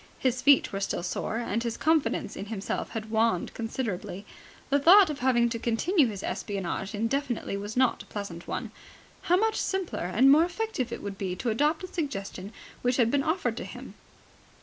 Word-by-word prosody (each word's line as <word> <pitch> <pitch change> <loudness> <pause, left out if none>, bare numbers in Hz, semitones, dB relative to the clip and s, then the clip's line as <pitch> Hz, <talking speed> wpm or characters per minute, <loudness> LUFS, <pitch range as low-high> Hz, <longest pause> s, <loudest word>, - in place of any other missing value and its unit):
His 255 -1 0
feet 280 -4 +5
were 195 - -2
still 195 -3 -2
sore, 185 +4 -2
and 230 -1 -1
his 230 -1 -3
confidence 310 -9 +1
in 200 - -6
himself 205 -2 -3
had 220 -1 -6
waned 220 -5 +1
considerably. 220 -4 -4 0.5
The 285 - +4
thought 360 +4 +7
of 290 - -6
having 245 -3 +3
to 230 0 -3
continue 265 - +2
his 200 -3 -6
espionage 195 +1 -3
indefinitely 240 +1 -1
was 205 +3 -5
not 260 -1 +3
a - - -13
pleasant 190 -5 -7
one. - - -4 0.6
How 360 - +6
much 440 +2 +1
simpler 380 - -2
and 265 +7 +6
more 305 +3 +7
effective 350 - -2
it - - -6
would 200 -1 -6
be 185 -2 -2
to 230 +5 -1
adopt 295 +8 +1
the 370 - -5
suggestion 200 - -5 0.3
which 245 0 +1
had 235 -3 +3
been 285 - +2
offered 320 +6 0
to - - -4
him. - - -9
235 Hz, 190 wpm, -28 LUFS, 205-290 Hz, 0.6 s, thought